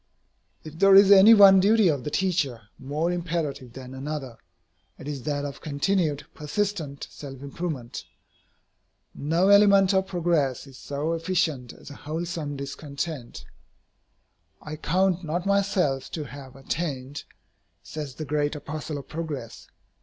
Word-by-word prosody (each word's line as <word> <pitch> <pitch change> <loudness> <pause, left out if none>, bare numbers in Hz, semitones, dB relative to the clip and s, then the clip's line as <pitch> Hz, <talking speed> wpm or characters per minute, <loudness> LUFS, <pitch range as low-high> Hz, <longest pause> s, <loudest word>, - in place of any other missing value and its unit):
If 160 +1 -10
there 195 0 +6
is 195 0 +8
any 200 +3 +9
one 195 -2 +8
duty 210 +1 +4
of 145 -6 0
the - - -3
teacher 145 - -1
more 150 +6 -2
imperative 165 -8 -3
than 130 0 -9
another, 135 -3 -6 0.6
it 135 - -10
is 145 -3 -4
that 145 -1 -2
of 140 -1 -7
continued, 155 0 -1
persistent 155 -3 -3
self 135 -3 -9
improvement. 140 -4 -5 1.1
No 165 +6 +1
element 200 -1 +6
of 190 0 +1
progress 165 -8 0
is 135 -2 -14
so 145 +3 -3
efficient 165 -7 -1
as - - -13
a - - -10
wholesome 160 -2 -4
discontent. 140 -1 -6 1.1
"I 150 - -7
count 180 +3 0
not 170 +3 -3
myself 195 -9 +1
to 155 - -3
have 135 0 -11
attained," 140 -1 -4 0.6
says 150 -4 -7
the 155 - -6
great 150 0 -1
apostle 150 +1 -6
of 140 - -9
progress. 155 -7 -6
155 Hz, 135 wpm, -25 LUFS, 140-180 Hz, 1.1 s, any